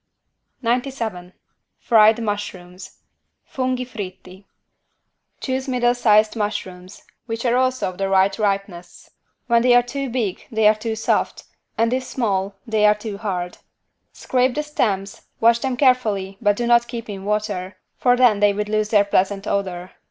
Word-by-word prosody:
97 230 -7 -2 0.5
FRIED 220 0 +4
MUSHROOMS 190 -3 -6 0.5
(Funghi 255 -1 -1
fritti) 190 -3 -9 0.9
Choose 260 0 -3
middle 245 -2 +2
sized 215 -3 +3
mushrooms, 200 -3 -5 0.2
which 230 +1 -4
are 240 0 +2
also 255 0 +1
of 185 - -12
the 195 0 -1
right 195 +2 +2
ripeness: 195 -4 -3 0.3
when 235 -1 +3
they 245 0 +4
are 245 - +5
too 275 +2 -4
big 230 -6 -3
they 220 -1 +3
are 215 - +6
too 220 +1 -4
soft 220 - -1 0.3
and 230 +2 +2
if 260 0 -1
small 200 -6 -2
they 220 -2 0
are 210 - +5
too 210 -1 -7
hard. 180 -4 -4 0.5
Scrape 255 0 0
the 300 - -1
stems, 200 -10 -2
wash 230 +1 +4
them 260 0 -2
carefully 215 -8 +1
but 205 -2 +3
do 240 - -2
not 235 0 +4
keep 235 -1 -6
in 195 -2 -7
water, 205 -3 -3 0.2
for 245 -1 +2
then 240 -5 +4
they 205 0 +4
would 210 +1 -3
lose 215 0 0
their 205 -2 +4
pleasant 195 0 0
odor. 185 -3 -3
215 Hz, 155 wpm, -21 LUFS, 195-240 Hz, 0.9 s, are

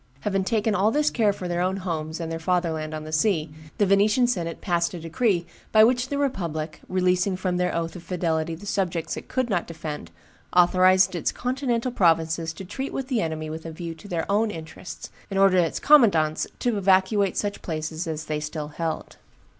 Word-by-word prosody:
Having 195 -2 0
taken 220 0 +1
all 205 +2 +3
this 300 +5 +2
care 220 -4 +3
for 185 -2 -6
their 175 0 -1
own 185 +2 0
homes 160 -4 -4
and 165 -1 -4
their 165 - -3
fatherland 165 -3 -1
on 155 - -5
the 155 - -8
sea, 155 -1 +1 0.3
the 205 - +3
Venetian 205 +5 +4
senate 170 -9 -2
passed 175 -2 0
a - - -6
decree 170 +2 0 0.3
by 215 0 +7
which 245 +2 +3
the 285 - -1
republic, 170 - -2
releasing 185 +1 +1
from 185 -1 -1
their 180 0 0
oath 165 -1 -2
of 180 - -8
fidelity 165 -2 -1
the 190 +6 -12
subjects 180 -5 -1
it - - -8
could 255 -2 -1
not 185 -7 -1
defend, 155 -3 -6 0.5
authorized 185 +1 +5
its 175 - -1
continental 250 -1 -1
provinces 165 -4 +2
to 190 +4 -9
treat 265 +9 -5
with 270 0 -4
the 245 -5 +1
enemy 160 -1 -3
with 160 +1 -6
a 165 - -6
view 165 +1 -6
to 165 +5 -13
their 170 -4 -2
own 210 +2 +2
interests, 165 0 -8 0.2
and 195 -1 -1
ordered 195 -2 +5
its 165 - -2
commandants 195 - +4
to 240 -4 0
evacuate 195 +1 +3
such 205 -1 -2
places 160 +1 -4
as 155 -1 -4
they 155 -1 -2
still 150 0 -5
held. 160 +1 -4
180 Hz, 200 wpm, -25 LUFS, 160-205 Hz, 0.5 s, by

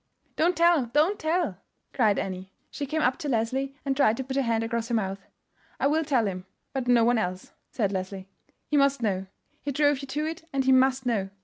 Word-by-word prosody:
"Don't 350 +3 +2
tell, 335 -6 +4
don't 305 - +2
tell!" 315 - 0 0.3
cried 215 -6 +3
Annie. 190 0 -4 0.2
She 285 - -4
came 310 +3 -1
up 250 +1 +2
to 300 -3 -3
Leslie, 265 +3 -1
and 270 -1 0
tried 250 -5 +3
to 265 - -2
put 265 +1 -5
her 275 - +2
hand 230 -3 0
across 230 0 -2
her 235 - -1
mouth. 195 -2 -3 0.5
"I - - +1
will 310 +3 +2
tell 265 -7 +1
him; 185 -1 -4 0.3
but 265 -2 -3
no 240 -2 +5
one 240 -1 +3
else," 185 -2 -4 0.2
said 205 -5 -1
Leslie. 190 0 -4 0.4
"He 300 - 0
must 275 -2 +3
know; 190 -3 -1 0.3
he 285 - -3
drove 290 0 +2
you 275 - -7
to 295 +3 -2
it, 320 +1 -5
and 270 -1 0
he 265 - +4
must 260 0 +3
know. 210 -6 0
260 Hz, 220 wpm, -27 LUFS, 215-285 Hz, 0.5 s, no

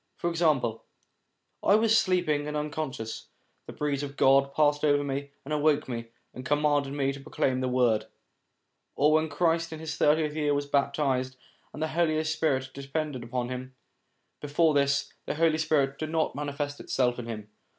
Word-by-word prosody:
For 170 - -2
example: 140 -9 +1 0.4
' - - -49
I - - +8
was 220 0 +4
sleeping 175 -9 +2
and 150 0 -2
un 150 0 -3
conscious, 135 -7 -5 0.4
the - - -6
breeze 145 -2 -2
of 140 -1 -6
God 135 +1 +4
passed 145 0 +2
over 145 -1 +3
me 140 0 -3 0.2
and 150 - -4
awoke 150 0 +2
me, 115 -2 -5 0.3
and 130 - -8
commanded 145 0 +1
me 140 -1 0
to 140 - -9
proclaim 135 -2 -1
the 130 - 0
Word 125 -4 +2 0.4
'; - - -51
or 150 +2 +4
when 155 +1 +2
Christ 165 +2 +1
in 160 - -6
his 155 -1 -5
thirtieth 150 0 +3
year 150 -2 +1
was 145 0 -1
baptized, 140 -2 0 0.4
and 155 - -5
the 160 - -1
Holy 155 -1 +1
Spirit 145 -4 0
descended 140 -1 -4
upon 120 +1 -3
him; 130 0 -6 0.7
before 150 +2 +2
this, 140 -1 +1
the - - -2
Holy 160 0 +2
Spirit 140 -3 +1
did 155 - -3
not 160 0 0
manifest 145 0 -4
itself 125 -2 0
in 120 - -6
him. 105 -2 -7
145 Hz, 180 wpm, -28 LUFS, 135-155 Hz, 0.7 s, I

